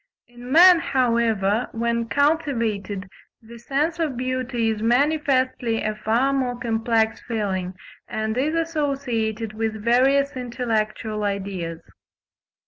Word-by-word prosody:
In 245 +1 -11
man, 350 +3 +8
however, 230 -6 +1
when 235 0 -1
cultivated, 230 - 0 0.3
the 235 +1 -13
sense 295 +8 -1
of 300 -7 -1
beauty 255 -2 -1
is 215 -1 -4
manifestly 255 -2 +1
a 215 - -1
far 230 +6 +1
more 255 -3 -1
complex 225 -1 0
feeling, 190 -5 -3 0.3
and 220 -1 -3
is 290 +6 0
associated 270 -9 -2
with 220 0 -2
various 270 +4 +3
intellectual 225 -4 -2
ideas. 190 -5 -4
235 Hz, 110 wpm, -23 LUFS, 220-270 Hz, 0.3 s, man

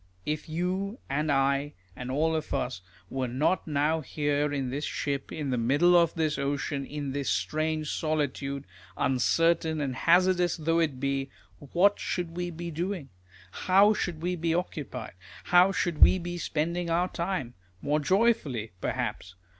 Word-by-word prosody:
If 150 +1 -3
you, 185 +6 -2
and 150 +2 0
I, 140 +1 +1 0.2
and 125 0 -6
all 160 +5 +1
of 155 -1 -2
us 90 - -2 0.3
were 130 -1 -1
not 145 +11 0
now 150 +2 +1
here 145 0 0
in 135 -3 -2
this 145 +3 -3
ship, 140 -3 -3
in 145 -4 -3
the 125 - 0
middle 145 +10 +4
of 170 -1 +4
this 155 -3 0
ocean, 140 0 -2
in 145 -2 -4
this 140 -1 -2
strange 155 - -1
solitude, 140 -3 -2 0.3
uncertain 160 +5 +2
and 135 -3 -2
hazardous 180 +2 +3
though 165 +1 +1
it 150 -6 0
be, 135 0 -1 0.3
what 180 +8 +2
should 170 -2 -3
we 175 0 -2
be 170 0 -6
doing? 170 -2 -3 0.4
How 195 - +4
should 170 -6 -3
we 180 +1 0
be 165 -1 0
occupied? 145 -9 -4 0.3
How 180 +2 +5
should 170 -3 -1
we - - +7
be 175 0 -5
spending 170 +2 -1
our 175 +2 +2
time? 170 -10 -3 0.3
More 150 +8 0
joyfully 160 - +1
perhaps 90 -1 -3
155 Hz, 155 wpm, -28 LUFS, 140-175 Hz, 0.4 s, we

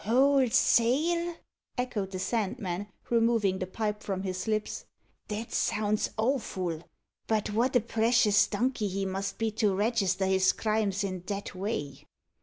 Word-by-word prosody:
"Wholesale!" 275 - +3 0.4
echoed 240 -6 -2
the 190 - -5
Sandman, 200 -1 -2 0.2
removing 230 -5 +2
the 185 - -3
pipe 210 +2 -3
from 190 -1 -3
his 185 +1 -3
lips. 215 -1 -2 0.4
"That 215 +2 -5
sounds 210 0 0
awful. 200 - -1 0.5
But 215 -2 0
what 245 +4 +1
a 245 - +5
precious 225 -1 +3
donkey 225 0 0
he 195 0 -2
must 195 +1 -3
be 225 -1 0
to 205 -3 +3
register 200 -3 +1
his 190 0 +3
crimes 215 -2 0
i' 185 -2 -4
that 200 -1 -4
way." 185 -7 -4
210 Hz, 135 wpm, -29 LUFS, 190-235 Hz, 0.5 s, a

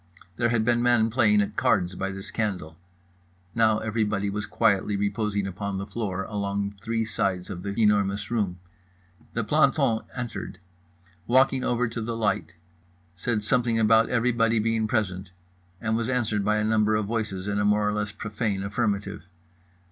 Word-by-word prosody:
There 120 -1 +2
had 115 -2 +1
been 120 0 +2
men 120 -2 +3
playing 105 -4 +4
at - - -6
cards 90 0 +2
by 95 +2 -3
this 95 0 -7
candle—now 90 +2 -3
everybody 105 -2 -1
was 105 +1 -4
quietly 105 -2 +2
reposing 100 0 -1
upon 95 +1 -4
the 95 - -4
floor 100 -3 -3
along 100 0 -2
three 115 +1 -1
sides 95 -4 -2
of 90 -2 -6
The 100 +2 -4
Enormous 100 -2 +2
Room. 100 -6 0 0.8
The - - -1
planton 110 -1 +3 0.2
entered. 120 -6 -5 0.7
Walked 130 +3 +5
over 125 -2 0
to 115 0 -5
the 115 +1 -3
light. 105 -5 -1 0.6
Said 105 +4 -1
something 120 0 +1
about 110 +1 +4
everybody 115 -2 +2
being 110 0 +1
present, 95 -4 -1 0.5
and 110 0 -1
was 115 +2 -1
answered 110 -5 0
by 105 +1 +2
a 105 - +1
number 110 0 +2
of 105 -1 0
voices 105 -3 -3
in 100 0 0
a - - +1
more 105 0 +3
or 105 - +1
less 105 0 -2
profane 105 -1 -3
affirmative. 100 -1 -2
105 Hz, 160 wpm, -26 LUFS, 100-115 Hz, 0.8 s, Walked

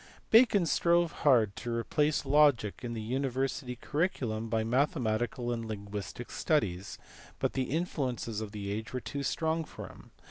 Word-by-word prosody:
Bacon 220 -5 +6
strove 170 +1 +3
hard 115 -12 +3
to 120 - -4
replace 145 +6 0
logic 140 -7 +4
in 120 -1 -3
the 115 - -4
university 130 +1 -2
curri 150 +8 0
culum 110 -5 -4
by 110 0 +1
mathematical 120 -2 0
and 115 -1 -2
linguistic 105 +2 -6
studies, 100 - 0 0.4
but - - -1
the 130 -1 -1
influences 130 -8 -2
of 105 -2 -5
the 100 -2 -5
age 105 0 -4
were 130 - -1
too 140 +3 -5
strong 160 +3 0
for - - -9
him. - - -15
125 Hz, 155 wpm, -31 LUFS, 110-150 Hz, 0.4 s, Bacon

